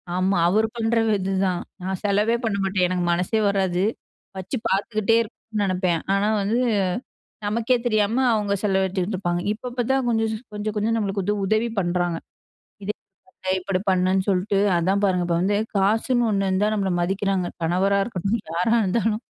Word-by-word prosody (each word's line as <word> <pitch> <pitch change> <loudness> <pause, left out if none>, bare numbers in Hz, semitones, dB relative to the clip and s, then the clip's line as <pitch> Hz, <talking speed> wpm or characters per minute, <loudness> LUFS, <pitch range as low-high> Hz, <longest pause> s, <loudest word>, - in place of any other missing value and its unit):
ஆமா 185 +1 +1
அவர் 215 +5 +3
பண்ற 230 0 0 0.2
இதுதான், 190 -1 0 0.2
நான் 190 -1 -3
செலவே 210 +3 +2
பண்ண 210 -3 0
மாட்டேன். 190 -1 +1
எனக்கு 180 -1 -1
மனசே 180 +6 +1
வராது. 190 -2 0 0.5
வச்சு 190 +8 -4
பார்த்துக்கிட்டே 215 +2 +1
இருக்கும்னு 220 -1 -5
நினைப்பேன் 180 -3 0
ஆனா 200 +1 +2
வந்து 220 +5 +1 0.9
நமக்கே 230 +4 +1
தெரியாம 220 +3 +2
அவங்க 205 -2 0
செலவடிச்சிட்டுருப்பாங்க. 190 -2 0
இப்ப 245 +3 -7
இப்ப 245 0 -2
தான் 265 -2 +1
கொஞ்சம் 225 -1 +1 0.2
கொஞ்சம், 210 0 -3
கொஞ்சம் 225 +2 +1
நம்மளுக்கு 200 -2 -1
வந்து 210 +2 0
உதவி 220 +4 +1
பண்ணுறாங்க. 175 -1 0 0.7
இதை 210 +2 -2 0.7
இப்படி 185 0 -1
பண்ணுன்னு 185 +1 +2
சொல்லிட்டு, 195 +1 +1 0.2
அதான் 190 +4 +1
பாருங்க, 180 -2 +1
இப்ப 170 -1 +1
வந்து 205 +2 +2 0.2
காசுன்னு 225 +4 +2
ஒண்ணுருந்தா 195 +1 +1
நம்மள 195 -2 0
மதிக்கிறாங்க! 195 0 0
கணவரா 190 +4 +2
இருக்கட்டும், 200 0 -2
யாரா 180 +7 +1
இருந்தாலும்! 215 +3 0
195 Hz, 145 wpm, -23 LUFS, 185-215 Hz, 0.9 s, அவர்